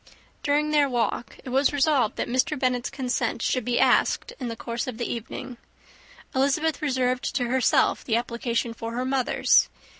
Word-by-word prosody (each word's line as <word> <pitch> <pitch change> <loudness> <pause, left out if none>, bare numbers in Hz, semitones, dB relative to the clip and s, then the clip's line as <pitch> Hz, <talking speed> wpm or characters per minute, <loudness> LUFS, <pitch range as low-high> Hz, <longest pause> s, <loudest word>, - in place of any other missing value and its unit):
During 300 0 +1
their 295 -2 +3
walk, 235 -1 -2
it - - -7
was 270 +3 +3
resolved 280 -5 +2
that - - -2
Mr. 260 +6 0
Bennet's 250 -2 0
consent 250 -3 -2
should 255 - 0
be 245 -1 0
asked - - +2
in 255 - -4
the 230 - -4
course 235 +2 -4
of 250 -3 -5
the 240 - -2
evening: 245 +2 -6 0.8
Elizabeth 285 +4 +1
reserved 255 -2 0
to 255 - +1
herself 255 -1 +2
the 225 - 0
application 235 0 -1
for 230 0 -6
her 250 +2 -2
mother's. 260 -1 +3
255 Hz, 170 wpm, -25 LUFS, 240-275 Hz, 0.8 s, their